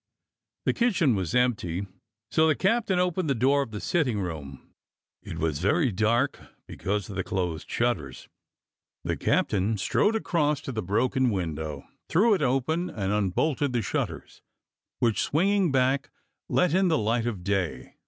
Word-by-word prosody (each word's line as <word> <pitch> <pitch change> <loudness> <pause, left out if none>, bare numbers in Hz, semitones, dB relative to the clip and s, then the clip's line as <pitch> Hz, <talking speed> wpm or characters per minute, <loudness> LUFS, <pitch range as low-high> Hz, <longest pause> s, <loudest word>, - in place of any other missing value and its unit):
The - - +2
kitchen 195 - +2
was 95 -3 -2
empty, 105 -7 +1 0.5
so 160 0 +4
the 155 - +3
captain 200 -1 +1
opened 180 -2 0
the 135 - +2
door 135 +4 +3
of 135 - -4
the 105 -1 -6
sitting 130 -9 0
room; 75 -7 -7 0.5
it - - -7
was 80 -3 -1
very 140 - +2
dark 115 +7 +1 0.3
because 100 0 -3
of 100 - -8
the 95 - -1
closed 90 -4 -3
shutters. 115 - -2 0.8
The - - -1
captain 100 +3 +1
strode 205 - +1
across 150 -9 +1
to - - -5
the 110 -3 -3
broken 125 +7 +1
window, 80 - -3 0.2
threw 215 +6 +4
it 190 - 0
open, 145 +7 0
and 100 -1 -2
unbolted 125 - 0
the 120 -2 0
shutters, - - -4 0.6
which, 115 -3 +1
swing 170 +7 +1
ing 200 -5 +2
back, 135 +1 +1 0.4
let 180 -3 +2
in 190 +1 +3
the 160 -3 +3
light 115 +2 0
of 100 -7 -4
day. 90 -10 -2
120 Hz, 160 wpm, -27 LUFS, 95-155 Hz, 0.8 s, so